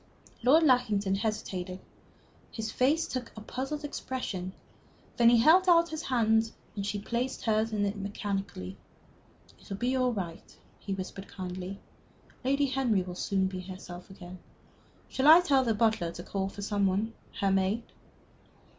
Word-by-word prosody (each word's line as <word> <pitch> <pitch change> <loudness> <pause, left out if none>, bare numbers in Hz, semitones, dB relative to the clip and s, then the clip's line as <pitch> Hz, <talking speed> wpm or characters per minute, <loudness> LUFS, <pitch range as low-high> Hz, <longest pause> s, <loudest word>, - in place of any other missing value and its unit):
Lord 285 +7 +5
Lackington 220 -8 +3
hesitated. 190 -3 -3 0.7
His 220 -1 -4
face 290 +6 +2
took 250 -2 -4
a - - -6
puzzled 270 +7 -4
expression. 250 -10 -4 0.7
Then 235 -1 +7
he 240 - +6
held 340 +10 +6
out 340 -1 +5
his 315 0 -4
hand, 225 -6 +2 0.2
and 200 - -3
she 205 +1 -2
placed 235 +5 -3
hers 220 0 +1
in 205 -1 +1
it 200 +1 -1
mechanically. 195 - -4 0.8
"It - - -17
will 195 - -4
be 245 +4 0
all 255 -1 +2
right," 180 -7 -6 0.2
he 195 - -4
whispered, 190 +1 -7
kindly. 185 +1 -6 0.6
"Lady 275 +2 +2
Henry 255 -8 +1
will 180 0 -7
soon 190 +1 0
be 190 0 -3
herself 180 -1 -9
again. 185 -1 -10 0.7
Shall 265 +2 0
I 320 +3 +11
tell 280 -7 +3
the 230 -3 +1
butler 220 -6 +2
to 175 - -8
call 195 0 -2
for 205 +1 -8
some 200 -1 +1
one 205 +4 0 0.3
her 195 -1 +2
maid?" 195 +4 +1
215 Hz, 155 wpm, -29 LUFS, 190-255 Hz, 0.8 s, I